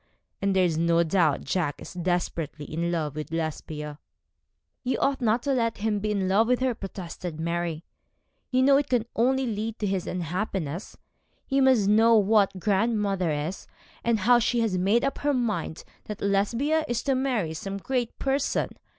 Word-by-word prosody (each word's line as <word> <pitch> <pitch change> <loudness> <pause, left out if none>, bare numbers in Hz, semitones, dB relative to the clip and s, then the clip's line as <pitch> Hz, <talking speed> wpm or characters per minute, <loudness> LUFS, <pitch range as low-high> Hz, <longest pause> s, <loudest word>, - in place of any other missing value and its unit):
and 195 -1 +1
there 185 -1 +4
is 160 -2 0
no 170 0 +3
doubt 160 -3 +2
Jack 145 -1 -1
is - - -9
desperately 170 -4 -2
in 170 +3 -2
love 155 -4 -2
with 155 0 -5
Lesbia.' 155 -2 -4 0.8
'You 255 0 0
ought 275 -1 0
not 230 +1 +2
to 280 - +1
let 230 -3 0
him 210 0 0
be 215 +1 -2
in 195 -2 0
love 205 +4 +3
with 250 0 +2
her,' 260 -1 +1
protested 180 -5 -7
Mary. 170 -1 -2 0.6
'You 255 -1 +2
know 275 +1 +6
it 285 0 -1
can 245 -3 +1
only 265 +3 +2
lead 220 0 -3
to 210 - -2
his 190 -2 -1
unhappiness. 180 -1 -3 0.5
You 275 0 +2
must 255 -7 +4
know 225 +3 +5
what 200 -2 +3
grandmother 200 -2 +1
is, 150 +5 -3 0.4
and 230 -3 +1
how 240 +4 +5
she 240 +1 +1
has 220 -5 0
made 195 +6 +2
up 275 - -2
her 290 -1 +1
mind 210 -10 -2 0.2
that 210 - -6
Lesbia 230 +11 +1
is 240 -1 -1
to 275 - +1
marry 250 -11 0
some 195 +5 -5
great 245 +3 -2
person. 275 0 0
200 Hz, 175 wpm, -26 LUFS, 170-240 Hz, 0.8 s, know